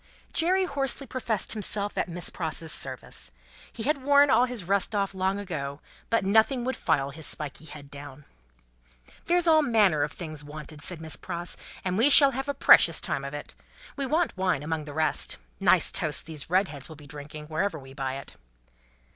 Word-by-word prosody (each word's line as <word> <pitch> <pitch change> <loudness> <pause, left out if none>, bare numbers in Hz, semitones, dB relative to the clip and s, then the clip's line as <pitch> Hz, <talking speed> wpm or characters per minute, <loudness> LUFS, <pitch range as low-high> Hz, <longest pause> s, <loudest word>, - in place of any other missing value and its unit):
Jerry 370 +3 +3
hoarsely 275 -3 -1
professed 240 -5 -2
himself 205 -1 0
at - - -1
Miss 175 +1 -2
Pross's 160 -1 -4
service. - - -4 0.4
He 225 - -7
had 285 +1 0
worn 285 +1 +5
all 250 - +5
his 245 -5 -3
rust 200 +3 0
off 200 -1 0
long 190 +1 0
ago, 150 -8 -5 0.3
but 230 -4 +1
nothing 220 +5 +3
would 260 - -1
file 140 -4 0
his 160 +2 -6
spiky 150 0 -5
head 145 -2 -11
down. 145 0 -11 1.0
"There's 350 0 +2
all 320 -2 +6
manner 210 - +3
of 145 0 0
things 155 -4 -7
wanted," 150 +1 -9
said 175 -1 -2
Miss 160 -1 -2
Pross, 175 -1 -4 0.3
"and 185 +2 0
we 255 +6 +6
shall 280 -1 +9
have 270 +2 -4
a 285 - -1
precious 165 - +6
time 135 - -2
of 140 +1 -6
it. 145 - -8 0.4
We 275 -2 -2
want 320 +4 0
wine, 185 -6 0
among 155 0 -3
the 145 - -8
rest. 155 +1 0 0.2
Nice - - +4
toasts 150 -2 0
these 155 -2 -5
Redheads 175 -7 0
will 160 - -10
be 150 0 -14
drinking, 150 +1 -9
wherever 160 +3 -2
we 135 -2 -12
buy 135 -1 -3
it." 135 - -9
175 Hz, 190 wpm, -27 LUFS, 150-240 Hz, 1.0 s, shall